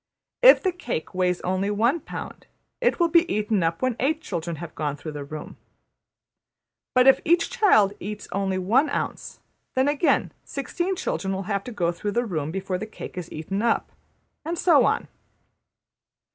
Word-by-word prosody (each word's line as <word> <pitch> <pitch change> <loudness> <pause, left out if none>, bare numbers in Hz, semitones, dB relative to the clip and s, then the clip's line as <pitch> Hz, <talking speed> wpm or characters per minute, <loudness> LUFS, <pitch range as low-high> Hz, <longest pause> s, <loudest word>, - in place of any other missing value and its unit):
If - - +8
the 375 - +2
cake 295 - -5
weighs 180 -1 0
only 185 +2 -1
one 230 +10 +2
pound, - - -8 0.3
it 485 -4 +2
will 340 - +4
be 340 +1 +4
eaten 210 -1 +1
up 165 +6 -1
when 255 -2 +1
eight 305 +4 +1
children 170 - -4
have 165 +1 -8
gone 145 -2 -3
through 155 +2 -7
the 145 -1 -6
room. 150 +2 -8 1.4
But 255 0 +6
if 270 - +6
each 340 +1 +2
child 390 - +4
eats 210 +1 -6
only 190 0 -1
one 235 +11 +2
ounce, - - -4 0.3
then 260 +1 +3
again 290 +3 +2
sixteen 345 +7 -3
children 195 - -2
will 190 - -3
have 200 0 -2
to 250 - -6
go 175 -6 0
through 205 +4 -4
the 240 +3 +1
room 155 -8 -3
before 190 +1 -3
the 215 - -5
cake 215 - -9
is 180 -2 -6
eaten 190 +6 -3
up, 230 0 +1 0.5
and 335 +3 -3
so 330 -4 +5
on. - - 0
210 Hz, 175 wpm, -25 LUFS, 180-285 Hz, 1.4 s, If